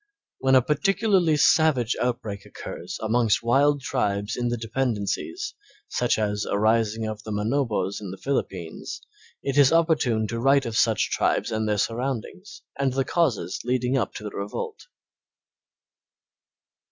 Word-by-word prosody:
When 135 0 +3
a 130 - +6
particularly 190 - +2
savage 140 -6 +3
outbreak 110 -5 -2
occurs - - -7
amongst 115 0 +2
wild 140 +4 +3
tribes 105 -5 -1
in 120 -1 -1
the 120 0 -1
dependencies, 120 - -2 0.4
such 120 -1 +1
as 105 -1 -1
a - - +1
rising 110 +1 +2
of 110 -1 -5
the 110 - -9
Manobos 105 -3 -1
in 100 - -6
the 95 - -7
Philippines, 95 -11 -4 0.4
it 140 +1 +1
is 140 -2 +6
opportune 155 -9 +2
to 115 - -3
write 135 +2 +4
of 115 -2 -4
such 110 -2 +2
tribes - - +1
and 110 -1 -1
their 105 - +1
surroundings, 135 - -3 0.2
and 135 -2 +1
the 135 0 0
causes 120 - 0
leading 125 +1 0
up 130 - -1
to - - -7
the 105 - -5
revolt. 105 - -5
120 Hz, 145 wpm, -25 LUFS, 110-140 Hz, 0.4 s, a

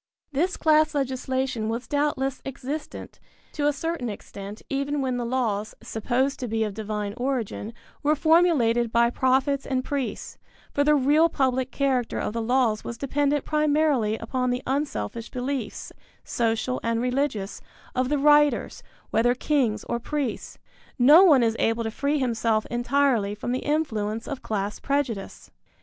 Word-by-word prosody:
This 340 +6 0
class 310 -1 +3
legislation 260 -3 -1
was 230 +2 -3
doubtless 285 -2 -1
existent 275 +3 -6 0.3
to 290 -2 0
a - - +4
certain 295 -3 -3
extent 200 0 -8
even 280 +1 -1
when 260 -2 -1
the 240 - -2
laws, 220 -5 -1
supposed 255 +5 -1
to 250 - -3
be 225 0 0
of 210 -2 -3
divine 210 -1 -4
origin, 245 -4 -2 0.3
were 300 +1 +2
formulated 295 -8 +3
by 235 +1 +3
prophets 265 +2 +1
and 260 -1 -2
priests, 280 -3 -4 0.3
for 285 - +2
the 300 +1 +4
real 295 +4 +4
public 260 -3 0
character 265 -4 0
of - - -2
the 230 - -2
laws 235 -2 +1
was 235 - -6
dependent 285 +1 0
primarily 300 -7 +2
upon 250 +3 -2
the 245 +1 -2
unselfish 265 -4 -3
beliefs, 255 -3 -4 0.3
social 230 +2 -1
and 230 0 0
religious, 250 -5 -1 0.3
of 255 0 0
the 295 - +1
writers, 295 +1 +3 0.3
whether 240 +2 +3
kings 255 -6 0
or 235 - -2
priests. 275 -2 -4 0.4
No 295 +8 +8
one 290 -10 +6
is 225 -1 +1
able 225 +1 +1
to 225 - -3
free 285 +6 0
himself 230 -4 0
entirely 240 -4 +1
from 225 +3 -4
the 255 - 0
influence 225 -8 -1
of 275 - -5
class 205 -1 -3
prejudice. 275 -8 -3
255 Hz, 150 wpm, -25 LUFS, 230-285 Hz, 0.4 s, No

